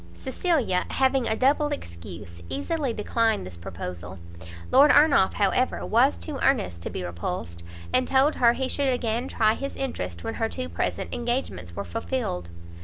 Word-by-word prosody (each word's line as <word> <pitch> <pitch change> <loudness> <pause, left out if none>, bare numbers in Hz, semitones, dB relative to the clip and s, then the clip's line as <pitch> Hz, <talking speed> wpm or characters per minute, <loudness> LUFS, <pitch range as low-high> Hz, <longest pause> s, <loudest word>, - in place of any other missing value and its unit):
Cecilia, 260 - 0
having 265 -2 +2
a 220 - +1
double 280 +5 +3
excuse, 85 - -7
easily 285 -2 -1
declined 225 - 0
this 90 -1 -8
proposal; 90 +1 -7 0.5
Lord 280 +3 +7
Ernolf, 285 -11 +5
however, 205 +6 +1
was 245 +6 +3
too 295 -4 -6
earnest 210 - +1
to - - -4
be - - -5
repulsed, 85 -1 -5 0.3
and 255 0 +2
told 270 +3 +4
her 235 -1 +5
he 265 +1 -1
should 275 0 +1
again 240 0 -1
try 220 -4 +2
his 275 +4 -5
interest 90 - -4
when - - -3
her - - -1
two 85 - -4
present 85 +1 -3
engagements 235 - -3
were 100 - -4
fulfilled. 90 - -3
230 Hz, 160 wpm, -26 LUFS, -, 0.5 s, Lord